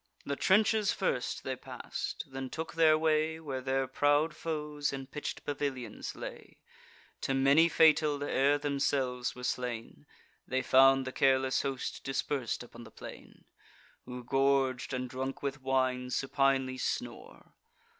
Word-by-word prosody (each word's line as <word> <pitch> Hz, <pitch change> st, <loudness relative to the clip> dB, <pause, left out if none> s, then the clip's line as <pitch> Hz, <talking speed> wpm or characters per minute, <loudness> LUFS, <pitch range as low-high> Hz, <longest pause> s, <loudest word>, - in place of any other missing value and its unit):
The 140 Hz, -, -2 dB
trenches 210 Hz, +4 st, +3 dB
first 125 Hz, -10 st, -2 dB
they 130 Hz, -, -3 dB
pass'd; -, -, -6 dB
then 135 Hz, 0 st, -6 dB
took 160 Hz, +4 st, -5 dB
their 160 Hz, -1 st, +5 dB
way 160 Hz, 0 st, +1 dB
Where 135 Hz, -5 st, -5 dB
their 135 Hz, 0 st, 0 dB
proud 145 Hz, +3 st, +2 dB
foes 150 Hz, -2 st, -3 dB
in 135 Hz, -1 st, -5 dB
pitch'd 145 Hz, +3 st, -6 dB
pavilions 135 Hz, -6 st, -4 dB
lay; -, -, -9 dB, 0.6 s
To 135 Hz, -, 0 dB
many 140 Hz, +5 st, +5 dB
fatal, 155 Hz, -3 st, +4 dB
ere 145 Hz, 0 st, +2 dB
themselves 135 Hz, -3 st, -1 dB
were 125 Hz, -, -9 dB
slain. 120 Hz, -, -4 dB, 0.4 s
They 130 Hz, 0 st, 0 dB
found 135 Hz, 0 st, +5 dB
the 130 Hz, -, -4 dB
careless 130 Hz, 0 st, +2 dB
host 135 Hz, -2 st, -4 dB
dispers'd 135 Hz, -3 st, -2 dB
upon 120 Hz, 0 st, -12 dB
the 115 Hz, -, -12 dB
plain, -, -, -12 dB, 0.6 s
Who, 125 Hz, 0 st, -7 dB
gorg'd, 135 Hz, 0 st, +1 dB
and 130 Hz, -1 st, -2 dB
drunk 130 Hz, +2 st, -5 dB
with 140 Hz, 0 st, -3 dB
wine, 130 Hz, -1 st, 0 dB
supinely 135 Hz, -1 st, +1 dB
snore. -, -, -5 dB
135 Hz, 135 wpm, -31 LUFS, 130-145 Hz, 0.6 s, their